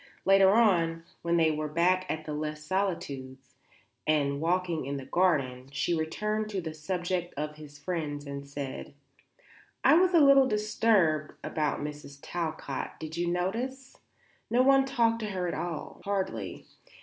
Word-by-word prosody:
Later 195 Hz, 0 st, +6 dB
on, 170 Hz, -7 st, +3 dB, 0.2 s
when 170 Hz, 0 st, +1 dB
they 160 Hz, -1 st, +4 dB
were 155 Hz, 0 st, -2 dB
back 180 Hz, +4 st, +2 dB
at 155 Hz, 0 st, -3 dB
Les 150 Hz, 0 st, -4 dB
Solitudes 140 Hz, -8 st, -3 dB, 0.5 s
and 145 Hz, -2 st, +1 dB
walking 170 Hz, -3 st, 0 dB
in 140 Hz, 0 st, -2 dB
the 135 Hz, -, -7 dB
garden, 135 Hz, -6 st, +1 dB
she 145 Hz, +5 st, 0 dB
returned 210 Hz, +7 st, -1 dB
to 200 Hz, -2 st, -2 dB
the 160 Hz, -3 st, -5 dB
subject 175 Hz, +2 st, -3 dB
of 150 Hz, +1 st, -4 dB
his 150 Hz, -1 st, -12 dB
friends 145 Hz, -2 st, -4 dB
and 140 Hz, 0 st, -7 dB
said: 140 Hz, -1 st, -6 dB, 0.9 s
"I -, -, +7 dB
was 360 Hz, +2 st, +5 dB
a -, -, +8 dB
little 275 Hz, -2 st, +7 dB
disturbed 210 Hz, -, +2 dB
about 150 Hz, -2 st, -1 dB
Mrs. 145 Hz, -1 st, -7 dB
Talcott; 160 Hz, -4 st, -4 dB
did 160 Hz, 0 st, -6 dB
you 175 Hz, 0 st, -1 dB
notice? 240 Hz, +10 st, -2 dB, 0.5 s
no 245 Hz, +2 st, +4 dB
one 270 Hz, 0 st, +5 dB
talked 230 Hz, -4 st, +2 dB
to 215 Hz, -2 st, -3 dB
her 185 Hz, -2 st, -2 dB
at -, -, -2 dB
all, 170 Hz, -3 st, -5 dB
hardly. 190 Hz, -, -3 dB
170 Hz, 150 wpm, -29 LUFS, 150-195 Hz, 0.9 s, a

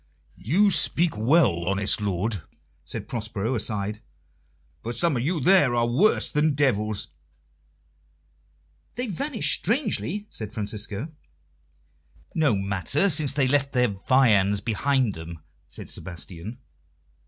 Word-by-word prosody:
"You 195 Hz, -, +2 dB
speak 165 Hz, -, +2 dB
well, 110 Hz, -, +3 dB
honest 95 Hz, +2 st, +2 dB
lord," 100 Hz, 0 st, -2 dB, 0.4 s
said -, -, -6 dB
Prospero 110 Hz, -2 st, -3 dB
aside, 105 Hz, -2 st, -2 dB, 0.8 s
"for 120 Hz, -, -4 dB
some 150 Hz, +6 st, +1 dB
of 120 Hz, -, -1 dB
you 160 Hz, +6 st, -1 dB
there 145 Hz, -5 st, +4 dB
are 120 Hz, 0 st, +2 dB
worse 170 Hz, -, +2 dB
than 150 Hz, 0 st, +1 dB
devils." 110 Hz, -7 st, 0 dB, 1.9 s
"They 245 Hz, -, -2 dB
vanished 245 Hz, -, 0 dB
strangely," 210 Hz, -, -1 dB
said 110 Hz, -1 st, -7 dB
Francisco. 105 Hz, +4 st, -5 dB, 1.2 s
"No 150 Hz, -8 st, +2 dB
matter, 100 Hz, -, +1 dB
since 150 Hz, -3 st, +3 dB
they 140 Hz, -2 st, +2 dB
left 140 Hz, 0 st, +1 dB
their 125 Hz, -2 st, +2 dB
viands 105 Hz, -2 st, +3 dB
behind 120 Hz, +2 st, 0 dB
them," 80 Hz, +1 st, -8 dB, 0.3 s
said -, -, -10 dB
Sebastian. 90 Hz, -, -8 dB
120 Hz, 115 wpm, -25 LUFS, 100-150 Hz, 1.9 s, there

